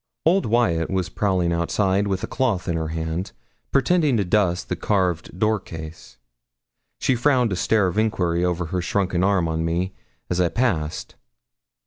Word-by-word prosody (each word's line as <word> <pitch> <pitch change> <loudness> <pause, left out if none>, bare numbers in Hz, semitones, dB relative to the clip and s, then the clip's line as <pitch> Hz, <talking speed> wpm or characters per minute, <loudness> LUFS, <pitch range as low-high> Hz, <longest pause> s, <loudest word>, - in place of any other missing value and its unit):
Old 180 0 +3
Wyat 90 -8 +1
was 95 -1 -1
prowling 95 -5 0
outside, 95 +4 +1
with 95 -1 -2
a - - -2
cloth 115 -9 -1
in 85 - 0
her 80 -1 -2
hand, 80 +3 -4 0.4
pretending 145 -2 +3
to 100 - +1
dust 90 -2 +1
the - - -2
carved 90 -4 -1
door 110 +1 +2
case. 80 -7 -10 0.8
She - - +1
frowned 125 -2 +2
a - - 0
stare 105 +3 +2
of 90 +3 0
enquiry 90 -6 +1
over 90 -1 0
her 90 +2 -2
shrunken 90 -1 0
arm 95 -3 +2
on 80 0 -1
me, 85 +3 -1 0.3
as 90 0 0
I 85 - +2
passed. 85 -12 -1
95 Hz, 165 wpm, -23 LUFS, 85-105 Hz, 0.8 s, Old